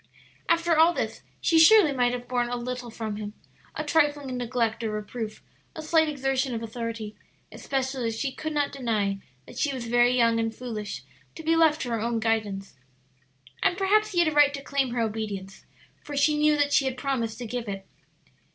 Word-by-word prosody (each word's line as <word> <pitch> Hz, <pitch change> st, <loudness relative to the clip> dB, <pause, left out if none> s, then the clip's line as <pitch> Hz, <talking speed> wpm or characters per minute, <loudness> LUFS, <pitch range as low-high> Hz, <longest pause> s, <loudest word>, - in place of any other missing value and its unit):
After 335 Hz, 0 st, +3 dB
all 325 Hz, +2 st, +5 dB
this, -, -, -3 dB, 0.2 s
she 330 Hz, -2 st, +4 dB
surely 330 Hz, 0 st, +7 dB
might 245 Hz, -2 st, +2 dB
have 245 Hz, 0 st, -5 dB
borne 245 Hz, -1 st, 0 dB
a 245 Hz, -, -2 dB
little 245 Hz, 0 st, -5 dB
from 220 Hz, -2 st, -5 dB
him 210 Hz, -1 st, -6 dB, 0.4 s
a -, -, -2 dB
trifling 290 Hz, -4 st, +1 dB
neglect 240 Hz, -2 st, -1 dB
or 225 Hz, -, -1 dB
reproof, 215 Hz, +1 st, -5 dB, 0.3 s
a 315 Hz, -, -6 dB
slight 315 Hz, 0 st, +3 dB
exertion 270 Hz, -3 st, -1 dB
of 225 Hz, -, -4 dB
authority, 230 Hz, -2 st, -5 dB, 0.4 s
especially 265 Hz, -2 st, -2 dB
as 225 Hz, 0 st, -3 dB
she 275 Hz, -, -1 dB
could 310 Hz, +4 st, -5 dB
not 290 Hz, -2 st, 0 dB
deny 215 Hz, -7 st, -1 dB, 0.3 s
that -, -, -10 dB
she 290 Hz, -, +1 dB
was 255 Hz, -3 st, -5 dB
very 240 Hz, +1 st, +3 dB
young 230 Hz, -1 st, +3 dB
and 225 Hz, 0 st, -1 dB
foolish 210 Hz, -, -6 dB, 0.3 s
to 320 Hz, -, -8 dB
be 325 Hz, +1 st, +2 dB
left 320 Hz, -1 st, +4 dB
to 245 Hz, -, -4 dB
her 230 Hz, -1 st, -1 dB
own 230 Hz, 0 st, 0 dB
guidance. 215 Hz, -3 st, -1 dB, 0.9 s
And 355 Hz, -, +2 dB
perhaps 425 Hz, +2 st, +2 dB
he -, -, -4 dB
had 345 Hz, -1 st, +5 dB
a -, -, +2 dB
right 290 Hz, -1 st, +5 dB
to 275 Hz, -, -7 dB
claim 275 Hz, -1 st, 0 dB
her 240 Hz, 0 st, -1 dB
obedience, 210 Hz, -3 st, -4 dB, 0.4 s
for 290 Hz, -1 st, -7 dB
she 300 Hz, +2 st, +3 dB
knew 300 Hz, 0 st, +3 dB
that 290 Hz, 0 st, +1 dB
she 290 Hz, -3 st, +4 dB
had 260 Hz, -1 st, -2 dB
promised 245 Hz, -5 st, -2 dB
to 245 Hz, -, -6 dB
give 235 Hz, -1 st, -4 dB
it. 195 Hz, -1 st, -5 dB
250 Hz, 200 wpm, -26 LUFS, 225-290 Hz, 0.9 s, surely